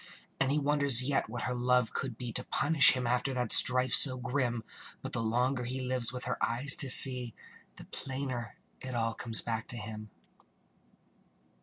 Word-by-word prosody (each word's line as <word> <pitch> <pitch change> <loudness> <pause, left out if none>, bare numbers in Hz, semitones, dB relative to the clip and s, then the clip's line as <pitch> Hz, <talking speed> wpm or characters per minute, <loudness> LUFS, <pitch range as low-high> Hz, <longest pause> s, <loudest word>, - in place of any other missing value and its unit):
And 135 0 -2
he 145 - -2
wonders 140 -4 +1
yet 140 -6 -3
what 120 +1 -8
her 125 - -5
love 125 -1 -2
could 125 -5 -7
be 120 -2 -9
To 125 - -4
punish 150 +1 +3
him 130 -2 -6
after 125 +2 -4
that 125 -3 -2
strife 125 -1 +3
so 130 +3 +8
grim; 125 -2 -5 0.4
But - - -9
the 115 - -4
longer 125 +3 -3
he 125 +2 -7
lives 125 -2 -2
with 125 -1 -8
her 125 -1 -6
eyes 125 +5 +3
to 135 - +3
see, 125 -2 +5 0.4
The - - -15
plainer 130 -4 -9 0.2
it 130 -1 -9
all 115 -1 -3
comes 115 0 -1
back 115 -1 -7
to 120 - -8
him. 105 -1 -11
125 Hz, 180 wpm, -27 LUFS, 120-130 Hz, 0.4 s, so